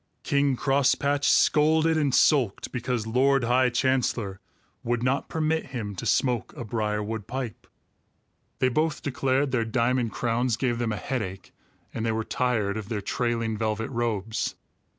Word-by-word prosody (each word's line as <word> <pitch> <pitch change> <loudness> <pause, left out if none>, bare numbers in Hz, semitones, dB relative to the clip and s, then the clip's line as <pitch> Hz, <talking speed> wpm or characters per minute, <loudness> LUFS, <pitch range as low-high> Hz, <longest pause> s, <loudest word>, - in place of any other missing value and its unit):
King 140 -1 +2
Crosspatch 140 +1 +2
scolded 160 +2 +4
and 150 -3 +1
sulked 130 -6 +2
because 120 -2 -2
Lord 130 +3 +2
High 125 +2 +3
Chancellor 120 -5 0 0.4
would 120 0 -1
not 130 +2 0
permit 160 0 0
him 110 -6 -5
to - - -4
smoke 125 -4 +1
a 120 - -5
briarwood 105 -1 -2
pipe. 130 -4 -5 0.9
They 130 - +2
both 155 +4 0
declared 135 0 0
their 120 -3 +1
diamond 120 0 0
crowns 120 0 0
gave 120 -2 0
them 120 -2 -1
a 105 - -2
headache, 95 -3 -4 0.4
and 115 - -3
they 115 - +1
were 110 0 -1
tired 110 -5 0
of 110 -1 -6
their 110 -3 -2
trailing 115 0 -1
velvet 110 +1 -2
robes. 115 -3 -2
120 Hz, 150 wpm, -26 LUFS, 110-135 Hz, 0.9 s, scolded